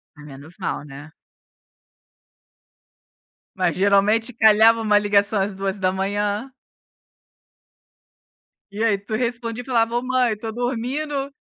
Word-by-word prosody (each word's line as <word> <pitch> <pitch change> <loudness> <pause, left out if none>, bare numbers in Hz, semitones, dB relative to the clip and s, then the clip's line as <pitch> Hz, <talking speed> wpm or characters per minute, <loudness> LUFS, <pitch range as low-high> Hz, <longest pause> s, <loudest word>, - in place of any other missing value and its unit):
Menos 150 +2 -12
mal, 170 -5 -3
né? 145 +2 -11 2.4
Mas 180 -3 0
geralmente 205 +5 +2
calhava 220 +1 +5
uma 210 -2 +3
ligação 205 0 +2
às 195 0 -2
2h00? 200 +4 -2 2.2
E 210 +3 -3
aí 210 -3 +2
tu 205 +2 -6
respondia 235 0 -3
e - - -15
falava, 235 -2 +1
"oh, - - -1
mãe, 255 -3 +1
tô 220 +1 -6
dormindo". 270 +4 -3
215 Hz, 105 wpm, -22 LUFS, 195-235 Hz, 2.4 s, calhava